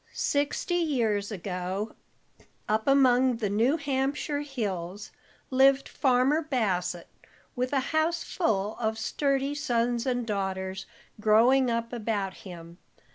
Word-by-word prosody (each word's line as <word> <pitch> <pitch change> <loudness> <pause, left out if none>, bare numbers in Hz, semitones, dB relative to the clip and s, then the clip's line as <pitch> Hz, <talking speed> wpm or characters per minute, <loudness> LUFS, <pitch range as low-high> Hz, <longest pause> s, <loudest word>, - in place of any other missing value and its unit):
Sixty 290 +5 0
years 230 -11 0
ago, 190 +2 -4 0.7
up 220 +3 0
among 260 -2 +4
the 210 -4 -2
New 235 +9 +2
Hampshire 285 +1 -1
hills, 205 -8 -4 0.4
lived 270 +1 +4
Farmer 265 +4 +2
Bassett, 185 - -1 0.5
with 250 0 -1
a 280 - +2
house 325 +2 +1
full 210 - -1
of 220 -1 -1
sturdy 275 +4 0
sons 240 -4 0
and 245 -2 0
daughters 190 -2 -3 0.3
growing 235 +5 +4
up 230 0 -2
about 210 -4 -2
him. 170 -1 -11
235 Hz, 115 wpm, -27 LUFS, 205-275 Hz, 0.7 s, among